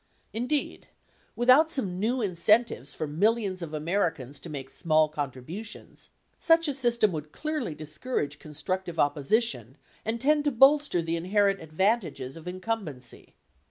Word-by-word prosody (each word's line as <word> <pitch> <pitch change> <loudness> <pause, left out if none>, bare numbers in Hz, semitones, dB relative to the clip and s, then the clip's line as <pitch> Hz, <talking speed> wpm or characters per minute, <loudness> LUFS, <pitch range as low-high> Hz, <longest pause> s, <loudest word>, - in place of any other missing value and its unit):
Indeed, 250 +6 -2 0.5
without 255 +7 +5
some 190 - -1
new 235 +4 0
incentives 195 - +2
for - - -3
millions 195 +4 0
of 165 -3 -6
Americans 155 -4 -2
to 170 - -10
make 135 -3 -7
small 155 -2 +3
contributions, 150 - -7 0.3
such 330 0 +4
a 290 - 0
system 240 -5 +2
would 155 -2 -6
clearly 305 - -3
discourage 155 - -4
constructive 170 +4 -4
opposition 145 - +1 0.3
and 225 +2 -2
tend 295 +4 +3
to 290 - +2
bolster 270 - +4
the 165 +1 -1
inherent 195 +3 +1
advantages 165 - -1
of 165 +1 -11
incumbency. 185 - -6
185 Hz, 130 wpm, -27 LUFS, 155-235 Hz, 0.5 s, without